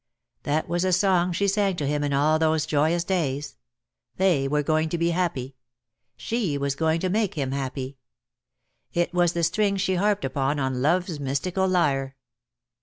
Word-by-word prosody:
That 150 +2 -1
was 175 +1 -1
the 185 0 +1
song 180 -1 +3
she 200 +4 0
sang 200 -1 +1
to 150 - -3
him 145 +1 0
in 145 - -1
all 150 +3 +2
those 160 -1 +2
joyous 155 +3 +1
days. 150 - -2 0.6
They 175 -8 +2
were 150 +1 0
going 155 +1 +1
to 170 - -2
be 170 +1 +1
happy. 140 -7 -2 0.6
She 180 - -1
was 140 -1 -1
going 160 +3 0
to 185 - 0
make 210 -1 0
him 135 -4 -2
happy. 135 0 -4 0.9
It 175 0 0
was 175 -1 +2
the 170 - -1
string 200 +4 +1
she 190 0 0
harped 205 -2 +1
upon 135 +2 -1
on 130 -2 -1
love's 170 +2 +1
mystical 155 +8 -1
lyre. 135 -7 +1
160 Hz, 175 wpm, -25 LUFS, 140-180 Hz, 0.9 s, song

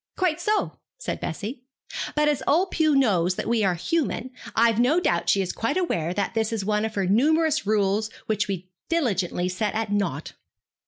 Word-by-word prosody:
'Quite 350 -3 +1
so,' 425 +3 0 0.2
said - - -4
Bessie; 235 +5 -5 0.5
'but 300 0 +3
as 295 -3 +1
old 360 +6 +3
Pew 310 -3 +2
knows 190 -9 +3
that - - -3
we 230 -1 +2
are 185 -3 +2
human, 260 - -1 0.2
I've 230 -1 +4
no 270 +8 +4
doubt 170 - 0
she 195 +2 +3
is 180 - -4
quite 230 +9 -1
aware 175 - 0
that 200 +2 -2
this 225 -1 0
is 215 -4 -2
one 210 +1 +1
of 220 - -5
her 195 -2 0
numerous 305 - +2
rules 210 0 +1 0.2
which 210 -1 0
we 185 -2 -5 0.2
diligently 195 - 0
set 205 +4 -2
at 220 -2 -2
nought.' 205 -1 -1
220 Hz, 190 wpm, -25 LUFS, 195-300 Hz, 0.5 s, I've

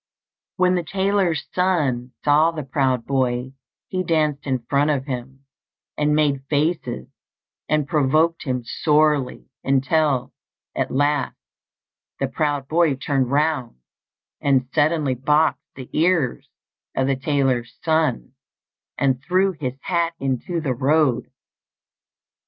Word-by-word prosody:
When 180 0 +3
the 180 - +1
tailor's 190 -3 0
son 145 -10 0
saw 150 +2 +5
the 160 -3 -5
proud 130 -2 0
boy 130 -1 -1 0.3
he 185 - -2
danced 155 -5 0
in 130 -3 -1
front 145 +1 +2
of 140 -3 0
him, 135 0 -6 0.5
and 150 0 +1
made 145 -3 +1
faces, 150 - -1 0.6
and 150 -2 +1
provoked 155 +2 +2
him 125 -3 -2
sorely, 150 -2 +1 0.2
until, 135 0 +1 0.4
at - - -1
last, 145 +1 0 0.8
the 135 - 0
proud 145 0 -1
boy 160 -2 +2
turned 135 -1 -1
round 145 - 0 0.6
and 135 -3 +2
suddenly 155 -3 +2
boxed 150 +5 +1
the 130 -2 -9
ears 160 -6 +1 0.5
of 130 - +1
the 135 0 +1
tailor's 130 -3 -1
son, 160 - 0 0.6
and 130 -2 +1
threw 190 +4 +2
his 135 -7 -5
hat 170 -2 0
into 135 +6 -2
the 145 -5 -1
road. 135 -1 +1
145 Hz, 120 wpm, -22 LUFS, 130-160 Hz, 0.8 s, saw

